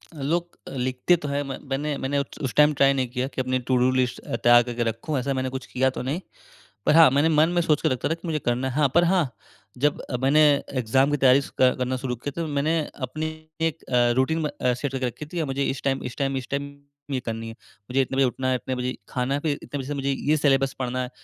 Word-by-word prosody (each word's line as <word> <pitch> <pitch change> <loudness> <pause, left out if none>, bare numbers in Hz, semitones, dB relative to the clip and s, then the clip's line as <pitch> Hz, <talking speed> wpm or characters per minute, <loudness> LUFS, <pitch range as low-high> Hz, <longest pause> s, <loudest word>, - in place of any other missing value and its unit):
अ, 145 - -8
लोग 170 +5 -2
अ, - - -7
लिखते 130 +6 +2
तो - - -2
है 140 0 -1
म 135 -1 -5
मैंने 145 +2 -1
मैंने 140 +2 -1
उ - - +1 0.2
उस 130 - -2
टाइम 150 0 +5
ट्राई 140 -1 +4
नहीं 130 -2 0
किया 125 +1 -2
कि 130 - -1
अपनी 130 0 0
टू-डू 125 0 +3
लिस्ट 130 -1 0
अ, - - -5
तैयार 120 +1 +6
करके 120 0 -2
रखूंँ 115 +6 -2
ऐसा 135 +2 -1
मैंने 130 0 -1
कुछ 130 0 -6
किया 130 +1 +1
तो - - -2
नहीं। 140 +8 -2 0.6
पर - - +4
हाँ, 165 -3 +9
मैंने 145 +4 +3
मन 155 +1 +4
में 175 - +3
सोच 155 -3 +2
के - - +2
रखा 130 +2 -1
था - - +2
कि 165 +1 -8
मुझे 155 -2 -1
करना 125 0 -1
है। - - -5
हाँ, 150 -2 +3
पर 175 - +6
हाँ 175 -5 +2 0.5
जब 145 +3 +1
अ, 125 - -4
मैंने 145 +3 +5 0.4
एग्ज़ाम 130 +5 +2
की 145 - +1
तैयारी 135 +1 +5
स - - -9
क 130 0 +5
करना 130 0 -1
शुरू 125 -1 -3
किया 145 +7 -5
तो 165 - -2
मैंने 150 +3 +1 0.3
अपनी 155 +5 -4 0.4
एक 165 -1 -1
अ, 120 -1 +2
रूटीन 160 +5 +2
म 155 - 0
अ, 125 - +2
सेट 130 +2 -3
करके 130 -1 -2
रखी 125 +5 -7
थी 175 - -2
और 155 - -2
मुझे 135 +1 -1
इस 135 -1 -2
टाइम, 135 -1 0
इस 125 - -6
टाइम, 135 -1 0
इस 130 - -5
टाइम, 140 0 -3 0.4
ये 135 - 0
करनी 115 0 -4
है। - - -8 0.4
मुझे 135 +2 +3
इतने 135 0 -2
बजे 135 - +5
उठना 130 +1 -2
है, 130 - +2
इतने 130 +1 -3
बजे 125 0 -2
खाना 125 +1 -1
है, 140 - 0
फिर 145 -1 -1
इतने 145 - -5
बजे 135 - -5
से 145 - -3
मुझे 140 0 -2
ये 145 +3 +1
सिलेबस 135 -2 +2
पढ़ना 130 0 -2
है, 125 - -4
135 Hz, 275 wpm, -24 LUFS, 125-145 Hz, 0.6 s, हाँ